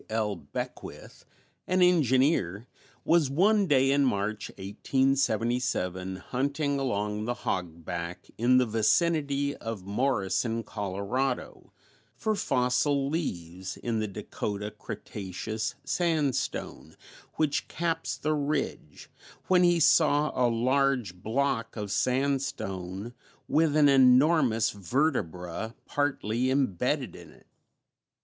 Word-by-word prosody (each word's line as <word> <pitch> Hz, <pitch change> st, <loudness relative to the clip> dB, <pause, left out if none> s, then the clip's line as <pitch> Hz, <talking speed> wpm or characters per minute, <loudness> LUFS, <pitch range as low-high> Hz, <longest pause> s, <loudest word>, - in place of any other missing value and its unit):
L. 110 Hz, -2 st, -1 dB
Beckwith, 75 Hz, -5 st, -8 dB, 0.4 s
an 185 Hz, 0 st, +3 dB
engineer, 130 Hz, -, +3 dB, 0.4 s
was, 165 Hz, -5 st, +3 dB
one 200 Hz, +7 st, +3 dB
day 135 Hz, -3 st, +4 dB
in 140 Hz, 0 st, +3 dB
March, 105 Hz, -3 st, -1 dB
1877, 115 Hz, -4 st, 0 dB
hunting 140 Hz, -, -1 dB
along 105 Hz, -4 st, -2 dB
the 120 Hz, +1 st, -1 dB
"hogback" 85 Hz, -2 st, -4 dB
in 125 Hz, +3 st, +4 dB
the 130 Hz, -, +4 dB
vicinity 140 Hz, +5 st, +1 dB
of 115 Hz, -5 st, -6 dB
Morrison, 115 Hz, 0 st, 0 dB
Colorado, 100 Hz, +7 st, -3 dB, 0.4 s
for 220 Hz, -, -1 dB
fossil 135 Hz, -3 st, +1 dB
leaves 95 Hz, -, -4 dB
in 115 Hz, -2 st, -2 dB
the 110 Hz, -, -1 dB
Dakota 105 Hz, +1 st, -5 dB
Cretaceous 110 Hz, +5 st, -5 dB
sandstone 155 Hz, -4 st, -1 dB, 0.4 s
which 150 Hz, -2 st, 0 dB
caps 165 Hz, 0 st, -2 dB
the 155 Hz, +1 st, 0 dB
ridge, 145 Hz, -, -3 dB, 0.4 s
when 185 Hz, -1 st, +5 dB
he 175 Hz, -1 st, +4 dB
saw 150 Hz, -1 st, +4 dB
a 125 Hz, -1 st, +2 dB
large 125 Hz, -2 st, +1 dB
block 115 Hz, +3 st, -1 dB
of 105 Hz, -3 st, -4 dB
sandstone 120 Hz, -6 st, -1 dB, 0.3 s
with 155 Hz, -1 st, +2 dB
an 150 Hz, -1 st, +6 dB
enormous 130 Hz, -3 st, +5 dB
vertebra 100 Hz, -, -2 dB
partly 130 Hz, -4 st, -1 dB
imbedded 130 Hz, -10 st, 0 dB
in -, -, -12 dB
it. -, -, -20 dB
125 Hz, 100 wpm, -28 LUFS, 105-140 Hz, 0.4 s, an